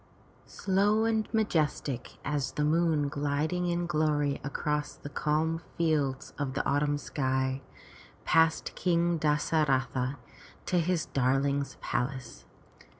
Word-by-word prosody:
Slow 205 +3 +2
and 220 -1 0
majestic 155 - -1
as 145 -2 -1
the 150 - 0
moon 160 -2 +2
gliding 150 +5 -1
in 175 0 0
glory 150 -3 +1
across 150 +1 -2
the 145 - -9
calm 155 +3 0 0.2
fields 150 -5 0
of 135 -2 -2
the - - -1
autumn 145 +1 +2
sky, 130 -2 -1 0.6
passed 160 0 +3
King 170 -1 +1
Das 150 +1 +1
a 160 -1 +5
ra'tha 130 -1 0 0.5
to 180 - +2
his 170 0 0
darling's 140 +2 0
palace. 125 -1 -3
150 Hz, 120 wpm, -29 LUFS, 140-170 Hz, 0.6 s, a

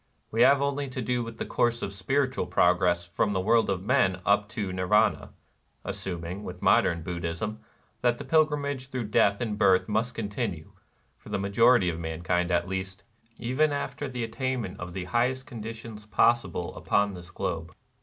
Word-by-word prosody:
We 115 - +1
have 140 +2 +6
only 140 0 -1
to 130 - -6
do 125 +1 0
with 115 -1 -8
the - - -3
course 120 0 0
of 100 - -3
spirit 130 +8 0
ual 90 - -3
progress 90 -1 +3
from 100 +4 0
the 95 - 0
world 110 +3 +3
of 95 -2 -1
men 110 -6 +2
up 100 0 +3
to 105 -5 -4
Nirvana, 105 +4 +2 0.3
— - - -41
assuming, 95 -1 -4
with 90 -2 -8
modern 85 -1 +3
Buddhism, 85 +5 -4 0.4
that 120 -1 +2
the - - -6
pilgrimage 145 -4 +1
through 125 -5 -4
death 100 0 +3
and 105 -3 -2
birth 95 -3 +4
must 110 +3 -1
continue, 100 -6 -4 0.5
for - - -14
the 105 - -1
majority 100 +2 +4
of 85 -1 -2
mankind 85 +2 -1
at 90 +1 +1
least, 95 +1 -5 0.3
even 130 +6 +1
after 145 0 -3
the 125 -2 -3
attainment 120 -3 -3
of 90 -1 -6
the 95 0 -4
highest 125 +5 0
conditions 110 -2 -8
possible 95 -4 +1
upon 100 0 +1
this 90 -2 -10
globe. 85 -1 -4
105 Hz, 175 wpm, -27 LUFS, 90-120 Hz, 0.5 s, have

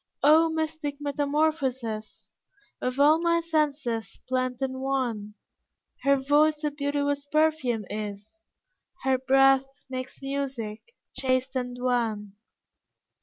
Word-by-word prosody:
O 315 +3 +6
mystic 315 -2 -2
metamorphosis 280 -6 -1 0.5
Of 255 +2 -2
all 300 +3 +6
my 335 0 +3
senses 290 -9 -1
blent 255 -1 -1
in 260 -1 -2
one! 245 -6 -2 0.7
Her 275 0 +4
voice 295 +3 +3
a 300 - 0
beauteous 285 0 -1
perfume 305 -8 +1
is, 210 +1 -7 0.6
Her 265 -1 +2
breath 270 0 +3
makes 255 0 -5
music, 270 -6 -4 0.3
chaste 260 0 0
and 250 -1 -3
wan. 225 -5 -1
270 Hz, 105 wpm, -27 LUFS, 245-290 Hz, 0.7 s, O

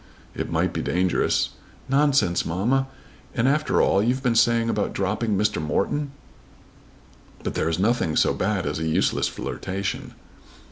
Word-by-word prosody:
"It - - -4
might - - 0
be - - -2
dangerous." 90 +1 +1 0.4
"Nonsense, 140 -9 +2
mamma! 115 +11 0 0.5
And 120 +1 +2
after 150 +2 +2
all 95 - +3
you've 125 +5 0
been 125 -3 +2
saying 115 0 +3
about 105 -3 -1
dropping 105 +2 -1
Mr. 105 -4 +1
Morton!" 100 - -1 1.3
"But - - -3
there 80 - 0
is 80 - -1
nothing 100 -5 +1
so - - +3
bad 95 -1 -1
as - - -2
a 80 - -2
useless 80 - +1
flirtation." 95 +1 -4
105 Hz, 145 wpm, -24 LUFS, 95-125 Hz, 1.3 s, all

